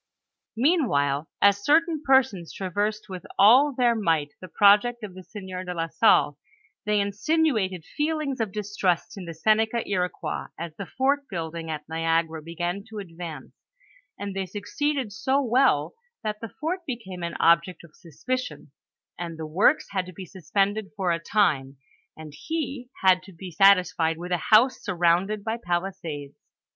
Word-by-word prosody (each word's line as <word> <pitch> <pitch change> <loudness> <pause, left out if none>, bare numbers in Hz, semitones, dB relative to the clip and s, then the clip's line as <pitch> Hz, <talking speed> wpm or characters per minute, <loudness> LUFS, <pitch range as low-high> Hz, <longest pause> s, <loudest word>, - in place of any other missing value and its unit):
Meanwhile, 160 - +1
as 200 0 +4
certain 320 +2 +3
persons 265 - +2
traversed 205 +3 -2
with 185 -2 -7
all 255 +9 +7
their 245 -3 +2
might 165 -9 0
the 185 - -8
project 210 +6 +4
of 200 -3 -7
the 185 - -10
sieur 185 0 -7
de 180 -1 -5
la 165 0 -2
Salle, 150 -4 +3 0.5
they 210 0 +2
insinuated 200 - 0
feelings 300 -3 -2
of 220 -4 -1
distrust 205 -2 -1
in 195 -3 -8
the 165 - -6
Seneca 220 +5 +1
Iroquois 180 -4 -2
as 165 -1 -6
the 195 +2 -7
fort 280 +2 0
building 165 -3 -5
at 150 -1 -5
Niagara 165 0 0
began 175 +4 -4
to 220 - -9
advance, 165 -7 -8 0.6
and 200 -1 -5
they 190 -1 -2
succeeded 235 - -2
so 260 +6 +1
well 250 - +2 0.3
that 210 -1 -3
the 230 - -6
fort 325 - -3
became 190 -8 -6
an 170 0 -4
object 170 +2 +3
of 165 -2 -17
suspicion, 165 - -5 0.5
and 170 -2 -5
the 160 - -5
works 190 - +2
had 190 -2 -2
to 185 - -10
be 185 +3 -8
suspended 195 +4 -1
for 185 -3 0
a 170 - 0
time, 155 -8 +1 0.4
and 155 -2 -10
he 280 - -4
had 185 -1 +5
to 190 +1 -14
be 180 +1 -9
sat* 195 +4 +7
isfied 165 -2 -1
with 175 +2 -7
a 175 -3 -2
house 245 +4 +5
surrounded 185 +2 +1
by 225 +1 -2
palisades. 175 -5 -4
195 Hz, 160 wpm, -25 LUFS, 170-225 Hz, 0.6 s, all